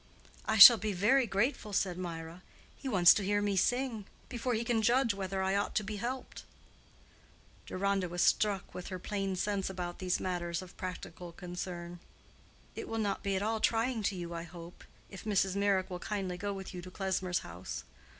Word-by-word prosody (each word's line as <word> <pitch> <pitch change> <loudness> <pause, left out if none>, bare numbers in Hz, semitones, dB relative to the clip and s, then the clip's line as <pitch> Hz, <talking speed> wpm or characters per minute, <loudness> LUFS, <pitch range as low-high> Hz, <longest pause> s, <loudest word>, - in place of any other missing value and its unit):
"I 220 - +2
shall 230 +3 +12
be 210 -1 -2
very 235 +8 +3
grateful," 210 +1 -1
said 190 -2 +1
Mirah. 170 -1 -6 0.3
"He 270 - -6
wants 180 -6 +7
to 205 - -1
hear 205 +1 +1
me 205 -1 0
sing, 235 +1 0 0.2
before 245 -1 -2
he 225 - -1
can 230 -1 +1
judge 235 +1 +3
whether 190 -1 -3
I 190 +1 +1
ought 200 - -1
to 215 - +2
be 210 +1 -5
helped." 250 +5 -5 1.2
Deronda 195 -1 0
was 175 0 0
struck 205 -3 +1
with 180 - -7
her 185 - -4
plain 195 0 -3
sense 195 +1 -1
about 180 -2 -5
these 185 -1 0
matters 175 -1 -2
of 180 - -14
practical 180 -1 -7
concern. 175 0 -6 0.8
"It - - -6
will 225 - -3
not 205 -3 -1
be 200 -1 -1
at 190 - -1
all 220 +1 0
trying 230 +1 +1
to 195 - -6
you, 175 -1 -5
I 170 - -4
hope, 170 0 -11 0.3
if 190 - -9
Mrs. 195 -3 +1
Meyrick 200 -2 +1
will 180 - -4
kindly 190 -2 -3
go 200 +3 -3
with 195 -1 -7
you 180 - -6
to 185 - -9
Klesmer's 185 -1 -1
house." 90 +2 -7
195 Hz, 190 wpm, -32 LUFS, 180-210 Hz, 1.2 s, shall